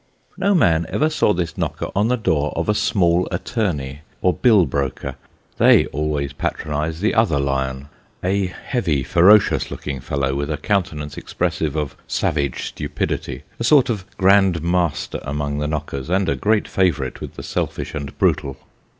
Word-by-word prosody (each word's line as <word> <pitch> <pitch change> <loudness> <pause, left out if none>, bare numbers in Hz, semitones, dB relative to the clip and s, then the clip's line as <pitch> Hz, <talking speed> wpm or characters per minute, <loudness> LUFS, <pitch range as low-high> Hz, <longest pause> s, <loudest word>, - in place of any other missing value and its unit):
No 200 +1 +2
man 85 - +3
ever 155 +2 +1
saw 150 - +2
this 85 -4 -2
knocker - - -3
on 105 +3 +2
the 125 - +2
door 75 -9 0
of 85 - -2
a 105 - +3
small 90 -4 +2
attorney 85 - -2 0.2
or 90 - +4
bill 110 -7 +4
broker; 70 -1 -3 0.5
they - - +6
always 75 -1 -2
patronise 75 +3 -3
the 110 - +2
other 110 -11 +2
lion; 65 0 -2 0.4
a 95 +1 +1
heavy 90 - -2
ferocious 95 +8 +4
looking 70 -2 -5
fellow, 65 +1 -1
with 70 +2 -2
a 75 - -1
countenance 75 -5 -2
expressive 75 -2 -2
of 75 -4 -2
savage 70 -4 -1
stupidity 65 +2 -4 0.2
a - - -2
sort 135 +2 +5
Jof 105 -6 -3
grand 95 -3 +4
master 85 -2 0
among 70 +1 -3
the 75 - -1
knockers, 75 -2 -4
and 95 +1 +1
a - - +1
great 105 0 +1
favourite 80 -9 0
with - - -7
the - - -8
selfish - - -3
and 70 -3 -6
brutal. 70 -1 +1
80 Hz, 160 wpm, -21 LUFS, 70-100 Hz, 0.5 s, they